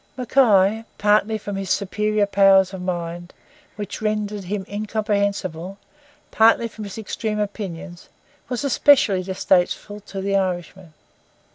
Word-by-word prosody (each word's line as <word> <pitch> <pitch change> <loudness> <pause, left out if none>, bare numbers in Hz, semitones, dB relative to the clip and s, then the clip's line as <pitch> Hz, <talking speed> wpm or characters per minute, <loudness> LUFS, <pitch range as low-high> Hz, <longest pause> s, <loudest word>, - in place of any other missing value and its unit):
Mackay, 220 -5 +3
partly 210 +1 +2
from 205 -1 -6
his 195 -2 -4
superior 210 +2 0
powers 195 -1 +4
of 190 - -6
mind, 175 -1 -5 0.4
which 205 0 -6
rendered 210 -2 -2
him 195 +1 -3
incomprehensible, 200 -4 -2 0.5
partly 230 +1 +4
from 220 -1 -9
his 200 - -8
extreme 220 0 -3
opinions, 190 -4 -5 0.4
was 250 +1 -3
especially 270 -7 +4
distasteful 190 +2 0
to 200 -1 -8
the 195 +1 -1
Irishman. 180 -2 -3
200 Hz, 120 wpm, -22 LUFS, 190-215 Hz, 0.5 s, powers